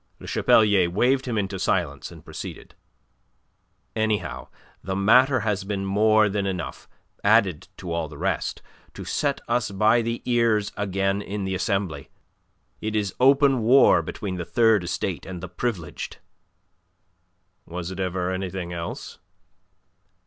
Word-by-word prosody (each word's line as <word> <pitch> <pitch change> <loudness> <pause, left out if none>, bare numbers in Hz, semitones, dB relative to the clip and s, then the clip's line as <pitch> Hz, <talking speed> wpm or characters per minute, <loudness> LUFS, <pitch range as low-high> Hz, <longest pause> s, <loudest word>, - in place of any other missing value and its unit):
Le - - -11
Chapelier 105 -5 +4
waved 130 +8 +1
him 115 -3 -1
into 95 -2 -2
silence, - - -1
and - - -13
proceeded. - - -8 1.2
"Anyhow, 105 - -1 0.4
the 95 0 -3
matter 125 +7 +4
has 105 -3 -1
been 100 -1 -3
more 110 +2 +4
than 100 -1 -1
enough, 90 -3 -5 0.3
added 100 -6 +3
to 90 -2 -7
all 85 -1 -1
the 75 - -11
rest, 90 +1 -2 0.3
to - - -7
set - - -1
us 120 -2 0
by 110 +4 +3
the 115 +1 -3
ears 115 -4 +2
again 100 0 -1
in 100 0 -4
the 95 0 -2
Assembly. 95 -2 -2 0.7
It 110 0 -3
is 100 -3 -1
open 135 0 +5
war 125 +5 +6
between 95 -3 -5
the 90 - -3
Third 110 0 +3
Estate 85 0 -3
and 95 -2 -6
the 95 - -6
Privileged." 90 -4 -4 1.5
"Was 90 +1 -5
it 95 - -7
ever 90 -1 -1
anything 95 -1 -4
else?" 85 -1 -6
100 Hz, 140 wpm, -24 LUFS, 90-110 Hz, 1.5 s, war